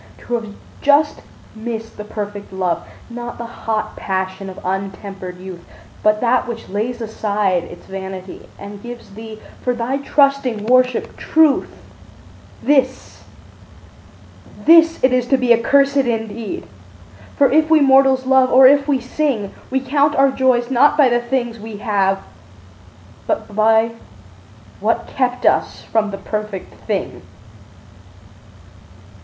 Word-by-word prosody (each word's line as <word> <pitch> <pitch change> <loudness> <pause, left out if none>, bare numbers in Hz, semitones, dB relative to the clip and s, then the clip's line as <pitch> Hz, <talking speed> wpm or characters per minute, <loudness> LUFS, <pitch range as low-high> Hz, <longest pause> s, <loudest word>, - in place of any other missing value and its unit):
To 245 - -7
have 220 -3 -3 0.3
just 295 +1 +3 0.3
missed 225 0 -6
the 210 - -7
perfect 205 -1 -7
love, 185 -3 -2 0.2
Not 240 0 -7
the 235 - -6
hot 225 -2 -4
passion 190 0 -3
of 185 - -9
untempered 195 -1 -5
youth, 185 -1 -9 0.4
But 215 0 +2
that 245 +1 +2
which 235 -1 -7
lays 230 +5 -3
aside 205 -5 -1
its 175 - -12
vanity 190 -1 -8
And 200 0 -10
gives 240 -2 -10
thee, 220 +1 -9 0.2
for 250 -1 -1
thy 245 +3 -2
trusting 275 -6 +1
worship, 255 +1 +2
truth— 315 -3 +3 0.9
This, 265 -2 0 1.4
this 325 0 +6
it 260 0 +4
is 250 -1 +1
to 270 - +3
be 250 -2 +4
accursed 275 +4 +3
indeed; 230 - -2 0.7
For 280 -2 +3
if 310 +2 +3
we 320 -1 +6
mortals 270 -2 +4
love, 260 -1 +4
or 260 +1 +7
if 280 +2 +5
we 280 -3 +2
sing, 250 -5 -2 0.2
We 265 - 0
count 285 +3 +1
our 270 0 +4
joys 255 -2 +1
not 290 +4 +4
by 280 -4 +5
the 240 0 +1
things 240 -2 -2
we 215 0 -8
have, 195 -2 0 1.0
But 205 - -3
by 220 +1 +3 0.9
what 220 +3 0
kept 250 -1 -2
us - - +1
from 220 -2 0
the 195 - -5
perfect 210 -1 -5
thing. 205 -4 -3
235 Hz, 135 wpm, -19 LUFS, 205-265 Hz, 1.4 s, or